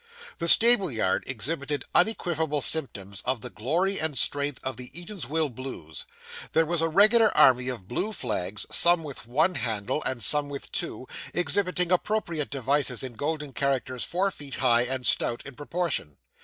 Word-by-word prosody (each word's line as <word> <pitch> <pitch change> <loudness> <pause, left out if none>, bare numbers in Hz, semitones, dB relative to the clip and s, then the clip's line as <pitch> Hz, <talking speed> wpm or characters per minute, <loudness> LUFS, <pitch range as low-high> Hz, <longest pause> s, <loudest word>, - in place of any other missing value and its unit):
The 170 - -2
stable 220 -1 +7
yard 100 -5 0
exhibited 140 +4 -3
unequivocal 160 -7 +1
symptoms 100 -11 -1
of 125 -2 -1
the - - -8
glory 175 - 0
and 155 -3 -2
strength 145 +3 0
of 130 -1 -3
the 125 +1 -8
Eatanswill 160 - -3
Blues. 110 - -7 0.5
There 160 0 +3
was 170 0 -1
a 165 - +1
regular 215 +6 +5
army 125 0 +5
of 115 -8 -6
blue 185 - -2
flags, 105 - -2
some 175 -1 +5
with 140 -6 -9
one 155 +9 +2
handle, 120 - -2
and 120 -4 -1
some 145 +6 +4
with 140 -1 -8
two, 170 -8 -4 0.3
exhibiting 180 +1 +1
appropriate 180 -5 -1
devices, 135 -1 0
in 130 -2 -6
golden 150 +2 -4
characters 130 -2 -1
four 195 +3 0
feet 145 -6 -9
high, 120 -2 +3
and 130 0 -4
stout 120 - 0
in 140 - -9
proportion. 145 - -3
145 Hz, 160 wpm, -26 LUFS, 125-170 Hz, 0.5 s, stable